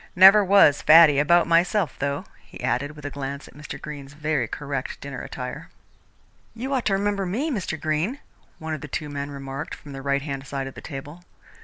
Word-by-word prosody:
Never 195 +3 +9
was 190 -7 +5
faddy 155 -3 +7
about 170 +4 +4
myself, 170 0 +2
though," 140 0 -2 0.2
he - - -13
added, 145 +4 -1
with 150 -1 -11
a 145 - -4
glance 140 0 -6
at - - -16
Mr. 145 -1 -8
Greene's 140 -2 -8
very 150 -5 -1
correct 140 +1 -5
dinner 140 -2 -7
attire. 125 -1 -7 0.9
"You 260 +4 -4
ought 260 -3 0
to 200 - +2
remember 200 -1 0
me, 260 - -1
Mr. 185 - -3
Greene," 155 - -1 0.4
one 160 0 -5
of 155 - -5
the 150 - -7
two 150 0 -4
men 140 0 -4
remarked 140 0 -6
from 145 - -13
the 135 -1 -7
right 140 0 0
hand 135 -2 -5
side 135 -1 -3
of 135 - -7
the - - -10
table. 145 +4 -8
150 Hz, 200 wpm, -24 LUFS, 140-175 Hz, 0.9 s, Never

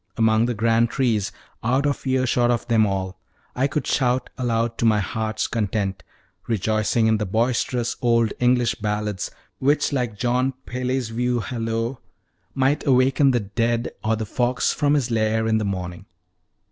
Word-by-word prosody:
Among 110 +1 +3
the 120 - -1
grand 115 +2 +2
trees, 115 -7 0 0.3
out 130 +5 +1
of 140 -1 -1
earshot 130 -2 +2
of 120 -1 0
them 110 -3 +3
all, 95 -1 -3 0.4
I 130 +2 +2
could 150 +1 -2
shout 125 -1 0
aloud 115 -2 -1
to - - +1
my 110 -2 +4
heart's 110 +1 -2
content, 100 -3 -2 0.5
rejoicing 110 +1 +1
in 110 -1 +3
the 105 - -1
boisterous 120 +3 0
old 115 -2 +2
English 125 -1 +3
ballads, 105 -3 -3 0.3
which, 145 +2 +2
like 120 -6 -1
John 125 +3 +1
Peele's 125 -1 -2
view 120 +1 0
hallo, 115 +1 -3 0.6
_"Might 135 +2 +1
awaken 135 +2 +4
the 120 -3 +2
dead 115 +3 -1
Or 110 +1 +1
the 110 0 -3
fox 125 +3 0
from 145 0 +2
his 130 -4 0
lair 110 0 +1
in 110 0 +2
the 105 - -2
morning." 90 -1 -5
115 Hz, 160 wpm, -23 LUFS, 110-125 Hz, 0.6 s, my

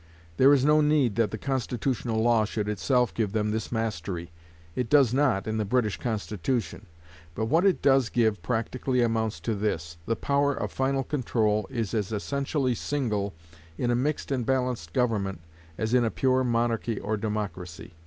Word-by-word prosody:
There 135 +2 +7
is 140 -2 +4
no 150 +1 +5
need 150 -6 +3
that 115 -3 +3
the 110 - -5
constitutional 125 -2 -1
law 115 -2 +4
should 105 0 -3
itself 125 +4 +1
give 105 -4 -1
them 105 -1 0
this 110 -1 -3
mastery. 95 -7 -3 0.4
It 125 -3 -2
does 140 -5 +5
not 130 -8 +2
in 110 0 -2
the 110 - +1
British 105 -3 0
Constitution. 105 -2 -3 0.5
But 110 - -1
what 165 - +2
it 190 - +1
does 135 -4 +4
give 110 -3 +1
practically 125 +2 0
amounts 110 -2 0
to 115 - -1
this: 85 -5 -2
the 115 - +1
power 140 +2 +1
of - - -3
final 135 0 0
control 110 -7 0
is 115 -4 -3
as 105 -2 -1
essentially 135 +4 -1
single, 105 - -2 0.4
in 120 - 0
a - - +2
mixed 145 +4 -1
and 130 -3 0
balanced 125 -8 -1
government, 105 -7 0 0.4
as 110 +2 -1
in 125 -1 +5
a 115 - +2
pure 130 +2 +1
monarchy 115 -2 0
or 110 +2 -2
democracy. 100 -5 -5
115 Hz, 175 wpm, -27 LUFS, 105-130 Hz, 0.5 s, There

